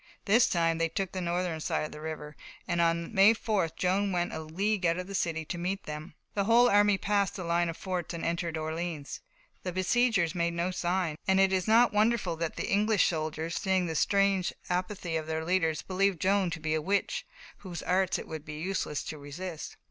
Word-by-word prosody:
This 225 Hz, +5 st, +5 dB
time 165 Hz, -1 st, +1 dB
they 165 Hz, 0 st, +1 dB
took 190 Hz, +2 st, -2 dB
the 185 Hz, -, -4 dB
northern 175 Hz, -1 st, -1 dB
side 155 Hz, -, -1 dB
of -, -, -7 dB
the 150 Hz, -, -9 dB
river, 155 Hz, -1 st, -6 dB, 0.3 s
and 170 Hz, -2 st, +1 dB
on 170 Hz, +2 st, +1 dB
May 205 Hz, +2 st, +6 dB
4th 200 Hz, -7 st, -1 dB
Joan 195 Hz, +2 st, +1 dB
went 175 Hz, -1 st, -1 dB
a -, -, -3 dB
league 190 Hz, +6 st, -1 dB
out 170 Hz, 0 st, +2 dB
of 180 Hz, -, -4 dB
the 195 Hz, -, -8 dB
city 165 Hz, -4 st, -1 dB
to 175 Hz, -, -5 dB
meet 190 Hz, +3 st, -2 dB
them. 150 Hz, +1 st, -7 dB, 0.2 s
The 200 Hz, -1 st, 0 dB
whole 235 Hz, +3 st, +6 dB
army 205 Hz, -2 st, +4 dB
passed 200 Hz, -1 st, 0 dB
the 185 Hz, -, -5 dB
line 170 Hz, 0 st, +1 dB
of 165 Hz, -, -5 dB
forts 180 Hz, -3 st, -3 dB
and 170 Hz, -1 st, -4 dB
entered 170 Hz, -1 st, -1 dB
Orleans. 160 Hz, -1 st, -4 dB, 0.4 s
The 180 Hz, -, -3 dB
besiegers 185 Hz, -1 st, +2 dB
made 170 Hz, -1 st, 0 dB
no 175 Hz, +2 st, 0 dB
sign, 175 Hz, -3 st, -1 dB
and 190 Hz, 0 st, +4 dB
it 195 Hz, 0 st, +4 dB
is 185 Hz, +1 st, 0 dB
not 230 Hz, +2 st, +5 dB
wonderful 210 Hz, -4 st, +2 dB
that 165 Hz, -1 st, -3 dB
the -, -, -3 dB
English 210 Hz, 0 st, +3 dB
soldiers, 160 Hz, 0 st, -2 dB
seeing 190 Hz, -1 st, +1 dB
that 165 Hz, -, -3 dB
strange 195 Hz, +1 st, +2 dB, 0.2 s
apathy 180 Hz, -2 st, -2 dB
of 155 Hz, -1 st, -5 dB
their 160 Hz, 0 st, -2 dB
leaders, 165 Hz, -3 st, +1 dB
believed 190 Hz, -1 st, +1 dB
Joan 195 Hz, -1 st, +2 dB
to 165 Hz, -1 st, -5 dB
be 155 Hz, 0 st, -1 dB
a 155 Hz, -, +1 dB
witch, 200 Hz, +5 st, -1 dB, 0.3 s
whose 175 Hz, -3 st, -7 dB
arts 185 Hz, 0 st, +1 dB
it -, -, -7 dB
would 160 Hz, -2 st, -6 dB
be 155 Hz, -1 st, -7 dB
useless 170 Hz, -4 st, -2 dB
to 155 Hz, -, -6 dB
resist. 155 Hz, +4 st, -7 dB
175 Hz, 215 wpm, -29 LUFS, 165-195 Hz, 0.4 s, May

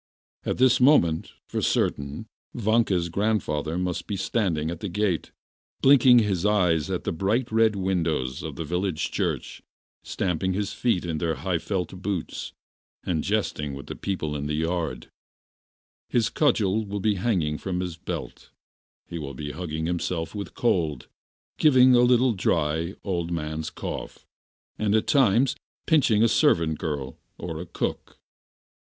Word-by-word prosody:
At -, -, 0 dB
this 130 Hz, -1 st, +4 dB
moment, 85 Hz, -, +4 dB
for -, -, -3 dB
certain, 70 Hz, +8 st, -1 dB, 0.3 s
Vanka's 110 Hz, -6 st, +2 dB
grandfather 85 Hz, -5 st, -1 dB
must 90 Hz, -1 st, -2 dB
be 105 Hz, -, -2 dB
standing 90 Hz, -6 st, 0 dB
at 85 Hz, -, -6 dB
the 105 Hz, -, -4 dB
gate, 95 Hz, -3 st, -1 dB, 0.5 s
blinking 130 Hz, -2 st, +7 dB
his 100 Hz, -6 st, +2 dB
eyes 90 Hz, -7 st, +2 dB
at 90 Hz, -2 st, -2 dB
the -, -, -1 dB
bright 110 Hz, +8 st, 0 dB
red 110 Hz, -1 st, +3 dB
windows 85 Hz, -9 st, -1 dB
of -, -, -6 dB
the 80 Hz, -, -4 dB
village 90 Hz, 0 st, -2 dB
church, -, -, -2 dB, 0.4 s
stamping 95 Hz, +1 st, -1 dB
his 100 Hz, +1 st, -2 dB
feet 115 Hz, -8 st, 0 dB
in 80 Hz, -2 st, -2 dB
their 80 Hz, -1 st, 0 dB
high 90 Hz, -3 st, -1 dB
felt 90 Hz, +1 st, -3 dB
boots, 100 Hz, -4 st, -3 dB, 0.5 s
and 80 Hz, -4 st, -1 dB
jesting 75 Hz, -9 st, -1 dB
with 70 Hz, -, -8 dB
the -, -, -7 dB
people 80 Hz, -6 st, -3 dB
in 75 Hz, 0 st, -3 dB
the 75 Hz, -, -1 dB
yard; 80 Hz, 0 st, -2 dB, 1.0 s
his 115 Hz, -4 st, +1 dB
cudgel 110 Hz, -8 st, +2 dB
will 100 Hz, 0 st, -4 dB
be 105 Hz, +2 st, +2 dB
hanging 90 Hz, -7 st, 0 dB
from 90 Hz, -2 st, -3 dB
his 90 Hz, -2 st, -3 dB
belt, -, -, -7 dB, 0.6 s
he 85 Hz, -, -6 dB
will 70 Hz, -3 st, -6 dB
be 75 Hz, +2 st, -5 dB
hugging 80 Hz, -2 st, -4 dB
himself 85 Hz, -1 st, -2 dB
with 100 Hz, -1 st, -6 dB
cold, 80 Hz, -, 0 dB, 0.5 s
giving 130 Hz, -4 st, +6 dB
a 120 Hz, -, +6 dB
little 125 Hz, 0 st, +4 dB
dry, 85 Hz, -1 st, 0 dB
old 85 Hz, -4 st, -2 dB
man's 80 Hz, -1 st, -3 dB
cough, -, -, -7 dB, 0.5 s
and 105 Hz, -1 st, +2 dB
at 110 Hz, -, +2 dB
times 125 Hz, -1 st, +3 dB, 0.3 s
pinching 125 Hz, -9 st, +4 dB
a -, -, +6 dB
servant 85 Hz, -, +2 dB
girl 70 Hz, -4 st, -4 dB, 0.2 s
or 80 Hz, -2 st, -5 dB
a 90 Hz, -, -8 dB
cook. -, -, -4 dB
90 Hz, 150 wpm, -25 LUFS, 80-110 Hz, 1.0 s, blinking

